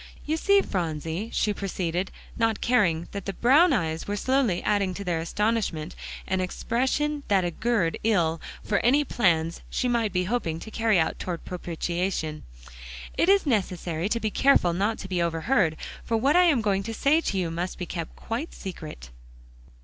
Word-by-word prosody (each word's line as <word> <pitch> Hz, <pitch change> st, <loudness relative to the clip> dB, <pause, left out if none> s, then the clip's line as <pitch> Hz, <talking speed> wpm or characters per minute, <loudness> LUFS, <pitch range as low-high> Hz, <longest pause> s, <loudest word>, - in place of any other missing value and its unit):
"You 310 Hz, -, 0 dB
see, 400 Hz, +4 st, +4 dB
Phronsie," 165 Hz, +2 st, -3 dB
she 210 Hz, -, +1 dB
proceeded, 185 Hz, -2 st, -2 dB, 0.3 s
not 225 Hz, -2 st, +1 dB
caring 175 Hz, -9 st, +2 dB
that 200 Hz, -2 st, -6 dB
the 195 Hz, -, -2 dB
brown 280 Hz, -, +5 dB
eyes 160 Hz, -1 st, -1 dB
were 205 Hz, -, -1 dB
slowly 250 Hz, -4 st, +1 dB
adding 200 Hz, -3 st, +1 dB
to 200 Hz, -, -5 dB
their 175 Hz, -3 st, -1 dB
astonishment 185 Hz, -3 st, -1 dB, 0.3 s
an 190 Hz, 0 st, 0 dB
expression 265 Hz, +10 st, -1 dB
that 195 Hz, -3 st, +3 dB
augured 180 Hz, 0 st, 0 dB
ill 170 Hz, -7 st, +2 dB, 0.2 s
for 205 Hz, -, +1 dB
any 275 Hz, +5 st, +4 dB
plans 170 Hz, -, +1 dB
she 250 Hz, -, -1 dB
might 235 Hz, -3 st, +1 dB
be 180 Hz, 0 st, +1 dB
hoping 180 Hz, -6 st, -1 dB
to 220 Hz, -, -9 dB
carry 225 Hz, -3 st, +2 dB
out 160 Hz, -, 0 dB
toward 175 Hz, -2 st, -5 dB
propitiation. 175 Hz, -2 st, -3 dB, 0.7 s
"It 345 Hz, -, +2 dB
is 395 Hz, -2 st, +5 dB
necessary 180 Hz, -, -1 dB
to 230 Hz, -, 0 dB
be 220 Hz, -2 st, -2 dB
careful 230 Hz, -11 st, +4 dB
not 205 Hz, +5 st, 0 dB
to 190 Hz, -, -7 dB
be 180 Hz, -2 st, -1 dB
overheard, 170 Hz, +1 st, +1 dB, 0.3 s
for 225 Hz, -, 0 dB
what 275 Hz, +7 st, +2 dB
I 360 Hz, 0 st, +6 dB
am 290 Hz, -9 st, +4 dB
going 200 Hz, -2 st, +1 dB
to 225 Hz, +3 st, -5 dB
say 300 Hz, +7 st, +3 dB
to 200 Hz, -, -2 dB
you 175 Hz, -3 st, -1 dB
must 175 Hz, +2 st, -3 dB
be 180 Hz, -, -4 dB
kept 165 Hz, -1 st, -6 dB
quite 240 Hz, +9 st, -5 dB
secret." 155 Hz, -, -8 dB
195 Hz, 175 wpm, -26 LUFS, 170-235 Hz, 0.7 s, I